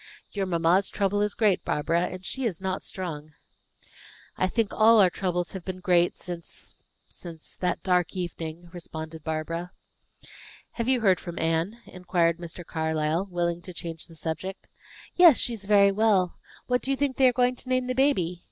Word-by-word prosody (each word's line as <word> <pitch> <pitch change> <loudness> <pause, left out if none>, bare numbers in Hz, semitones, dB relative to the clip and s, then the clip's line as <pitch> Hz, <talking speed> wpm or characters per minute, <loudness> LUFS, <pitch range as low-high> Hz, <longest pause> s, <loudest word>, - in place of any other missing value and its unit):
"Your 195 -2 -2
mamma's 175 +2 +2
trouble 205 0 0
is 210 0 0
great, 210 -5 +2
Barbara; 165 +4 0
and 185 0 -8
she 265 +8 -3
is 205 -9 -1
not 190 0 -2
strong." 155 -5 -6 1.0
"I 185 - +1
think 220 +2 -1
all 225 +1 +6
our 185 -3 +6
troubles 180 -2 -2
have 190 -3 -7
been 185 0 -5
great 175 -1 +3
since 175 -2 -7 0.3
since 165 -2 -10
that 180 -1 -1
dark 180 -1 +1
evening," 170 -1 -5
responded 160 -2 -7
Barbara. 165 +2 -3 1.0
"Have 230 -1 -3
you 255 -2 +3
heard 190 -4 +4
from 175 -1 -8
Anne?" 165 +8 -1
inquired 175 -2 0
Mr. 170 0 -7
Carlyle, 160 +3 -1
willing 175 -1 -1
to 180 0 -10
change 165 -2 -6
the 165 - -15
subject. 165 +4 -5 0.5
"Yes, 345 -7 +8
she 240 - 0
is 205 -3 -7
very 200 -1 +5
well. 195 -3 +2 0.3
What 250 0 +1
do - - -3
you 275 - +1
think 280 -2 0
they 265 - +6
are - - +5
going 250 0 +2
to 255 - -9
name 255 0 +2
the 255 - -1
baby? 190 - +2
180 Hz, 180 wpm, -26 LUFS, 170-210 Hz, 1.0 s, Yes